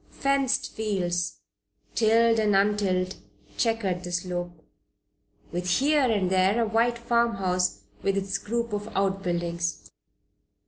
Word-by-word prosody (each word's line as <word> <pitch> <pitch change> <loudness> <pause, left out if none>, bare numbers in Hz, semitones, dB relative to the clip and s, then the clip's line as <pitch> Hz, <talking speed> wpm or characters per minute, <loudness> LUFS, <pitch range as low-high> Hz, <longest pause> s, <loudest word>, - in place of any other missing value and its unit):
Fenced 275 -1 0
fields, 180 -5 -2 0.5
tilled 230 0 +4
and 210 -2 +2
untilled, 195 -2 +1 0.4
checkered 210 -7 0
the 180 - -6
slope, 175 -2 -4 0.9
with 180 +1 -3
here 280 +6 +3
and 190 -4 +1
there 190 +4 +3
a 230 - +2
white 230 +2 +2
farmhouse 195 -6 0 0.2
with 195 0 0
its 195 0 -1
group 235 0 -3
of 205 +1 -3
outbuildings. 175 -4 -1
195 Hz, 110 wpm, -26 LUFS, 180-230 Hz, 0.9 s, tilled